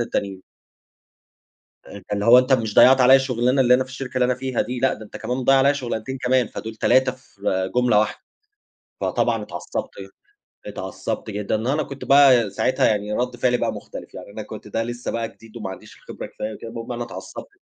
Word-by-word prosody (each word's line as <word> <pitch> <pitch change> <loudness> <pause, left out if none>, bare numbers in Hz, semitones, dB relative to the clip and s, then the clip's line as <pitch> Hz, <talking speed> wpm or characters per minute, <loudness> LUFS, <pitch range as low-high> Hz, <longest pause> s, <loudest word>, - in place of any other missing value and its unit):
التانيين. 100 -5 -3 1.4
آآ، - - -12
أنت 95 - -15
اللي 100 0 -1
هو 120 +2 +8
أنت 130 +1 +2
مش 110 -4 0
ضيّعت 130 +1 +7
عليَّ 130 +2 +7
شُغلانة 125 0 +1
اللي 125 -1 +5
أنا 130 - +3
في 130 - -16
الشركة 130 0 -7
اللي 125 - +3
أنا 125 0 +1
فيها 130 -1 -2
دي، 125 +2 -4
لأ، 130 - +2
ده 110 - -10
أنت - - -10
كمان 125 +3 -3
بتضيّع 135 +2 +4
عليَّ 140 +2 +4
شغلانتين 130 -1 -4
كمان، 125 -2 +1
فدول 110 +2 -7
3 130 +4 +3
في 100 -7 -3
جملة 125 -4 +4
واحدة. 105 0 -1 0.8
فطبعًا - - 0
اتعصّبت - - -5 0.8
اتعصّبت - - -5
جدًا 105 0 -2
وأنا 150 +3 +1
كنت 140 0 -9
بقى 135 -6 +6
ساعتها 100 +6 +1
يعني 105 -1 -1
رَد 125 +2 -2
فعلي 125 0 +1
بقى - - -1
مختلف، - - -10
يعني 95 +2 -10
أنا 110 - -7
كنت 105 0 -10
ده 115 +2 -2
لسّه 120 +1 -5
بقى 115 -1 -2
جديد 115 +1 -14
وما 105 -4 -5
عَنديش 95 - -11
الخبرة - - -9
كفاية 110 +1 -6
وكده، 115 - -9
المهم 115 +1 -7
أنا 120 0 -3
اتعصبت. 120 - -9
120 Hz, 200 wpm, -22 LUFS, 110-130 Hz, 1.4 s, هو